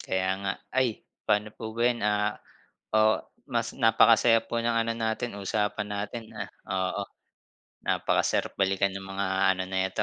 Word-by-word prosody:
Kaya 95 Hz, 0 st, -1 dB
nga. 100 Hz, -1 st, -1 dB, 0.2 s
Ay 130 Hz, -4 st, 0 dB, 0.2 s
paano 105 Hz, 0 st, +2 dB
po 110 Hz, 0 st, -7 dB
ba 115 Hz, -, -3 dB
yan, 120 Hz, -1 st, +2 dB
ah, 105 Hz, 0 st, +1 dB, 0.6 s
oh, 110 Hz, 0 st, +4 dB, 0.3 s
mas -, -, -2 dB
napakasaya 115 Hz, -2 st, +5 dB
po 120 Hz, -, -2 dB
ng 115 Hz, 0 st, +1 dB
ano 115 Hz, 0 st, +1 dB
natin 110 Hz, -1 st, -2 dB
usapan 105 Hz, +1 st, -1 dB
natin, 105 Hz, +3 st, -5 dB
ah, -, -, -4 dB, 0.2 s
oo. 95 Hz, +1 st, -1 dB, 0.8 s
Napakasarap -, -, +1 dB
balikan 95 Hz, 0 st, +2 dB
ng 95 Hz, -, -5 dB
mga 95 Hz, 0 st, -2 dB, 0.3 s
ano 95 Hz, -, -2 dB
neto, 95 Hz, +2 st, -1 dB
105 Hz, 150 wpm, -28 LUFS, 95-115 Hz, 0.8 s, napakasaya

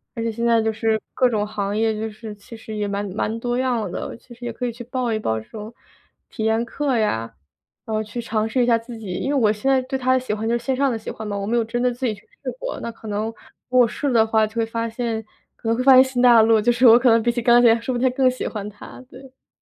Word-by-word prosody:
而 230 Hz, -, -4 dB
且 230 Hz, -, 0 dB
现 235 Hz, +1 st, -3 dB
在 230 Hz, -1 st, +4 dB
就 220 Hz, 0 st, 0 dB
是 220 Hz, 0 st, 0 dB
各 255 Hz, -, +3 dB
种 210 Hz, -3 st, -1 dB
行 205 Hz, -1 st, -3 dB
业， 220 Hz, 0 st, +2 dB
就 220 Hz, +1 st, -3 dB
是 215 Hz, 0 st, -9 dB
其 230 Hz, +3 st, -13 dB
实 220 Hz, -1 st, -8 dB
也 205 Hz, -1 st, -2 dB
蛮 200 Hz, +1 st, -2 dB
蛮 220 Hz, +1 st, -2 dB
多 240 Hz, +1 st, -2 dB
样 245 Hz, -6 st, 0 dB
的， -, -, -6 dB
其 240 Hz, +1 st, -16 dB
实 245 Hz, -, -15 dB
也 240 Hz, -, -3 dB
可 250 Hz, +2 st, -5 dB
以 240 Hz, -, -1 dB
去 240 Hz, +1 st, -9 dB
报 250 Hz, -1 st, -2 dB
一 -, -, 0 dB
报 110 Hz, -, -1 dB
这 110 Hz, -, -14 dB
种 220 Hz, +1 st, -9 dB, 0.5 s
体 220 Hz, -, -6 dB
验 220 Hz, +1 st, +1 dB
课 270 Hz, 0 st, -1 dB
呀， 115 Hz, -, -1 dB, 0.5 s
呃， 215 Hz, -1 st, -2 dB
去 215 Hz, +3 st, -7 dB
尝 220 Hz, -1 st, -1 dB
试 255 Hz, +2 st, +1 dB
一 -, -, +3 dB
下 235 Hz, -1 st, +4 dB
自 230 Hz, 0 st, -9 dB
己 205 Hz, -4 st, -7 dB
因 265 Hz, -, -3 dB
为 280 Hz, -, +2 dB
我 220 Hz, -4 st, +3 dB
现 265 Hz, +6 st, 0 dB
在 265 Hz, -, +3 dB
对 265 Hz, +1 st, -3 dB
它 255 Hz, 0 st, 0 dB
的 260 Hz, -, +4 dB
喜 250 Hz, -4 st, -3 dB
欢 220 Hz, +2 st, -2 dB
就 235 Hz, -, +2 dB
是 235 Hz, -, -10 dB
线 265 Hz, -, 0 dB
上 275 Hz, 0 st, +1 dB
的 230 Hz, -, -2 dB
喜 220 Hz, -, -8 dB
欢 220 Hz, -, -7 dB
嘛， 205 Hz, -1 st, -3 dB
我 200 Hz, -, -3 dB
没 235 Hz, -, 0 dB
有 235 Hz, -, +2 dB
真 235 Hz, +2 st, -3 dB
的 250 Hz, 0 st, +1 dB
自 250 Hz, +2 st, -4 dB
己 230 Hz, -, 0 dB
去 205 Hz, -, -14 dB, 0.2 s
试 -, -, -3 dB
过， -, -, -4 dB
那 235 Hz, -, -4 dB
可 225 Hz, -1 st, -13 dB
能， 210 Hz, +1 st, -2 dB
如 -, -, -4 dB, 0.4 s
果 255 Hz, 0 st, +5 dB
我 -, -, +2 dB
试 285 Hz, +5 st, -3 dB
了 -, -, -1 dB
的 225 Hz, -1 st, +4 dB
话， 220 Hz, -1 st, +3 dB
就 215 Hz, -, -11 dB
会 230 Hz, -1 st, +1 dB
发 230 Hz, 0 st, -3 dB
现 225 Hz, -1 st, -3 dB, 0.3 s
可 225 Hz, -, -5 dB
能 230 Hz, -, +1 dB
会 255 Hz, -, 0 dB
发 270 Hz, -, +7 dB
现 260 Hz, 0 st, +9 dB
新 260 Hz, -2 st, -2 dB
大 240 Hz, -2 st, +7 dB
陆， 220 Hz, 0 st, +4 dB
就 215 Hz, -, +1 dB
是 245 Hz, +2 st, +2 dB
我 230 Hz, +1 st, +9 dB
可 250 Hz, 0 st, +4 dB
能 230 Hz, 0 st, +5 dB
比 240 Hz, -, +2 dB
起 240 Hz, 0 st, -3 dB
钢 240 Hz, 0 st, +5 dB
琴 230 Hz, -1 st, +5 dB
说 255 Hz, +3 st, -3 dB
不 240 Hz, -, -2 dB
定 260 Hz, 0 st, +3 dB
还 -, -, -7 dB
更 260 Hz, -1 st, +4 dB
喜 255 Hz, -, -4 dB
欢 210 Hz, -2 st, -5 dB
它， 210 Hz, +4 st, -12 dB
对， 255 Hz, -, -13 dB
对。 265 Hz, -1 st, -19 dB
230 Hz, 345 characters per minute, -22 LUFS, 220-245 Hz, 0.5 s, 现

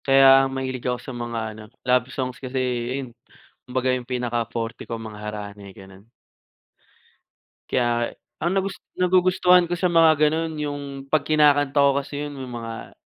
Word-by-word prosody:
Kaya 135 Hz, 0 st, +6 dB, 0.2 s
mahilig 130 Hz, -1 st, -4 dB
ako 125 Hz, -, 0 dB
sa 135 Hz, -, -8 dB
mga 120 Hz, -1 st, -4 dB
ano 110 Hz, 0 st, -11 dB, 0.2 s
love 125 Hz, 0 st, +2 dB
songs 130 Hz, -1 st, -4 dB
kasi 130 Hz, 0 st, -5 dB, 0.4 s
ayun, 135 Hz, -3 st, -5 dB, 0.6 s
kumbaga 130 Hz, 0 st, 0 dB
yung 125 Hz, -1 st, -4 dB
pinakaforte 120 Hz, -2 st, -3 dB
ko 115 Hz, -, -3 dB
mga 110 Hz, -2 st, -9 dB
harana, 105 Hz, -1 st, -6 dB
eh, -, -, -13 dB
gano'n. 95 Hz, +3 st, -15 dB, 1.6 s
Kaya, 120 Hz, -1 st, 0 dB, 0.3 s
ang 170 Hz, -, +1 dB
nagus 195 Hz, 0 st, -1 dB, 0.2 s
nagugustuhan 180 Hz, -1 st, +4 dB
ko 175 Hz, -, -1 dB
sa 180 Hz, -, -1 dB
mga 165 Hz, -2 st, +5 dB
gano'n 160 Hz, +1 st, -2 dB
yung 145 Hz, -1 st, -3 dB, 0.2 s
'pag 150 Hz, +2 st, +2 dB
kinakanta 145 Hz, -2 st, +3 dB
ko 140 Hz, 0 st, +6 dB
kasi 145 Hz, +1 st, -5 dB
'yun 145 Hz, -, -7 dB
yung 125 Hz, -2 st, -7 dB
mga, 115 Hz, -1 st, -8 dB
130 Hz, 155 wpm, -23 LUFS, 120-150 Hz, 1.6 s, Kaya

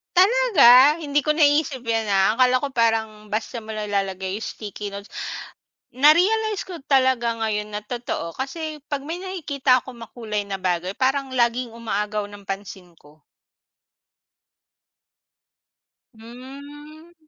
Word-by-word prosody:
Talaga 335 Hz, -, +6 dB
hindi 290 Hz, -2 st, 0 dB
ko 305 Hz, -, +2 dB
naiisip 295 Hz, -3 st, +2 dB
'yan 230 Hz, -2 st, -1 dB
na 200 Hz, +1 st, +2 dB
akala 255 Hz, 0 st, +3 dB
ko 285 Hz, -, -2 dB
parang 220 Hz, -4 st, -1 dB
basta 225 Hz, +1 st, -3 dB
mo 220 Hz, -, -7 dB
nilalagay 195 Hz, -2 st, -3 dB
'yong 220 Hz, -, -6 dB
sticky 205 Hz, -1 st, -7 dB
notes. 200 Hz, +1 st, -8 dB, 0.9 s
Na-realize 390 Hz, +9 st, +4 dB
ko 365 Hz, -3 st, -8 dB
talaga 260 Hz, -3 st, +3 dB
ngayon 210 Hz, -1 st, -2 dB
na 210 Hz, -, -3 dB
totoo 220 Hz, -7 st, -5 dB
kasi 305 Hz, +3 st, -5 dB
pag 285 Hz, -2 st, -2 dB
may 330 Hz, +3 st, -4 dB
nakikita 285 Hz, -9 st, 0 dB
akong 255 Hz, -2 st, -12 dB
makulay 210 Hz, -3 st, -5 dB
na 200 Hz, -1 st, -4 dB
bagay 180 Hz, +1 st, -1 dB
parang 270 Hz, 0 st, 0 dB
laging 240 Hz, -1 st, 0 dB
umaagaw 210 Hz, -2 st, -3 dB
ng 205 Hz, -1 st, -13 dB
pansin 195 Hz, -3 st, -7 dB
ko. 150 Hz, +1 st, -21 dB, 3.0 s
Hmm. 285 Hz, +7 st, -12 dB
240 Hz, 125 wpm, -22 LUFS, 210-290 Hz, 3.0 s, Talaga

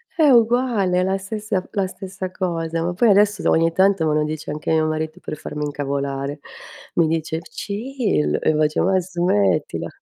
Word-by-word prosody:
È 315 Hz, -3 st, +4 dB
uguale, 235 Hz, -6 st, +3 dB
è -, -, +2 dB
la 190 Hz, +1 st, 0 dB
stessa 205 Hz, 0 st, -3 dB
la 195 Hz, -2 st, 0 dB
stessa 190 Hz, 0 st, -7 dB
cosa. 165 Hz, -3 st, -2 dB
Ma 175 Hz, +1 st, -1 dB
poi 230 Hz, +6 st, +3 dB
adesso 205 Hz, 0 st, +4 dB
s -, -, -7 dB
ogni 165 Hz, 0 st, +3 dB
tanto 190 Hz, -1 st, +3 dB
me 155 Hz, -, +2 dB
lo 150 Hz, 0 st, +2 dB
dice 155 Hz, 0 st, -4 dB
anche 150 Hz, +2 st, -3 dB
mio 160 Hz, -1 st, +3 dB
marito 155 Hz, +2 st, -3 dB
per 155 Hz, -, -6 dB
farmi 150 Hz, +1 st, -5 dB
incavolare. 140 Hz, 0 st, -3 dB, 0.6 s
Mi 170 Hz, -2 st, +3 dB
dice: 160 Hz, 0 st, -1 dB
"Chill", 205 Hz, -, -2 dB
e -, -, +2 dB
io 155 Hz, -, +2 dB
faccio: 155 Hz, 0 st, +2 dB
"Ma 190 Hz, 0 st, +3 dB
smettila". 170 Hz, -, 0 dB
175 Hz, 185 wpm, -21 LUFS, 155-195 Hz, 0.6 s, È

